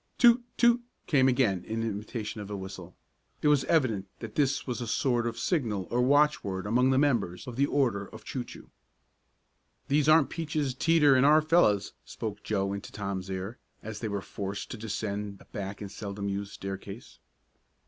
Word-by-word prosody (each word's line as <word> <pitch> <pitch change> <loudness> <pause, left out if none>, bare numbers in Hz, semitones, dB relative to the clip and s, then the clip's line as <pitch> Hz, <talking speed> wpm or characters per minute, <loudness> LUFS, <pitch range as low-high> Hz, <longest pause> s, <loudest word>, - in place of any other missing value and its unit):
"Toot 240 0 +6
Toot!" 240 0 +5 0.2
came 130 -4 +4
again 120 -8 +2
in 110 +3 -3
imitation 110 0 -4
of 100 - -8
a 100 - -4
whistle. 95 -2 -8 0.5
It 150 - +5
was 140 -3 +3
evident 115 - +1
that 115 -2 -8
this 140 0 +1
was 125 -1 -3
a 120 - -4
sort 120 +1 +1
of 115 - -4
signal 110 - -1
or 120 - +2
watchword 130 -9 +2
among 125 +5 +3
the 130 - +3
members 120 -11 +1
of 125 - -7
the 140 +3 +2
Order 115 -10 +1
of - - -12
Choo 130 - -4
Choo. - - -13 1.2
"These 145 +1 +3
aren't 155 -4 +5
Peaches, 150 -4 -2
Teeter, 150 0 +4
and 130 0 +4
our 150 +2 +6
fellows," 130 - +3
spoke 105 -2 -6
Joe 100 -2 -1
into 100 0 -6
Tom's 95 -2 -4
ear 95 +5 -5 0.2
as 110 -1 -6
they 115 - -3
were 100 -1 -3
forced 100 0 -5
to 120 - -5
descend 105 -2 -4
a - - -17
back 100 -1 -6
and 100 -2 -6
seldom 100 -1 -5
used 100 +1 -4
staircase. 100 +3 -8
115 Hz, 180 wpm, -29 LUFS, 100-140 Hz, 1.2 s, Toot